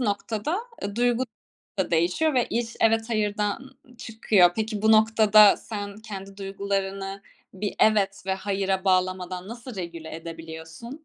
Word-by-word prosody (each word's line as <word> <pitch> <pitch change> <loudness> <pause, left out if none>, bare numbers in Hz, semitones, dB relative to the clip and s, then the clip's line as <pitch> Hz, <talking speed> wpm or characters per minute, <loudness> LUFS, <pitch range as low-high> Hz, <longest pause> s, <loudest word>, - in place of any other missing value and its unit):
noktada, 220 - -1 0.2
eee, 200 +2 -4
duygu 245 +1 +2 0.5
da 190 - 0
değişiyor 180 - +2
ve 245 - +2
iş 230 0 -2
"evet, 225 0 +3
hayırdan" 210 +4 -1 0.2
ı 245 - -21
çıkıyor. 215 -6 +3
Peki, 215 -1 -2
bu 220 - +5
noktada 215 -1 +6
sen 205 -2 -6
kendi 195 -2 -8
duygularını 195 0 -3 0.3
bir 200 +2 -3
"evet" 205 -2 +3
ve 190 - +1
"hayıra" 195 0 -1
bağlamadan 185 0 0
nasıl 235 0 -8
regüle 170 -3 -6
edebiliyorsun? 165 - -9
205 Hz, 135 wpm, -25 LUFS, 190-225 Hz, 0.5 s, noktada